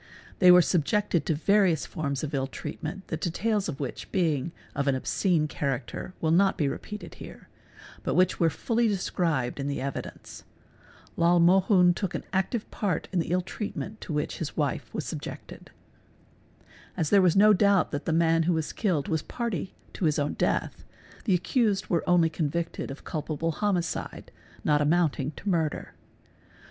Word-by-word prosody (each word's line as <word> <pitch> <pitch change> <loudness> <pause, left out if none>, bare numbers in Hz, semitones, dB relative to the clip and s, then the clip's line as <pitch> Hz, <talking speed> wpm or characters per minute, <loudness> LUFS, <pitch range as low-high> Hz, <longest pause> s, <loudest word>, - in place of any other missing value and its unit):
They 180 - +7
were 180 0 +8
subjected 175 0 +1
to 160 - +2
various 185 0 +3
forms 140 -3 -3
of 155 0 -4
ill 135 -1 0
treatment, 175 +7 -7
the 160 - -2
details 195 +4 -1
of 140 - -5
which 140 -3 -5
being 165 -5 0 0.2
of 140 0 -2
an 135 - +3
obscene 160 +4 +1
character 135 +4 -4
are 160 - +2
not 195 +4 +3
repeated 165 +8 -3
here, - - -11 0.5
but - - -2
which 185 0 +3
were 165 - +4
fully 230 +8 0
described 165 - -1
in 140 - -2
the 140 - -2
evidence. 140 0 -6 0.8
al 170 +1 +4
Mohun 180 +1 +5
took 190 0 -3
an - - -3
active 195 +4 -1
part 185 -7 -2
in 185 - 0
the 165 - -2
ill 180 +2 +2
treatment 210 +3 -6
to - - -7
which 150 +1 -2
his 160 - -5
wife - - -1
was - - -4
subjected. - - -8 0.6
| - - -27
As 155 - -1
there 200 - +6
was 180 -3 +4
no 210 +2 +7
doubt 200 -1 +3
that 145 0 -4
the - - 0
man 165 0 +3
who - - +4
was 160 -2 -2
killed 175 -10 0
was 160 -1 0
party 210 -7 -4 0.2
to 185 - -2
his 155 -2 +2
own 145 0 0
death - - -1 0.4
the 195 - +3
accused 205 +2 0
were 170 - +2
only 175 -2 +5
convicted 165 +1 -2
of 135 - -8
culpable 155 +1 -2
homicide 180 -1 -2 0.3
not 150 -1 +3
amounting 150 -3 +2
to 190 - -11
murder. 165 -5 -1
170 Hz, 170 wpm, -27 LUFS, 150-190 Hz, 0.8 s, were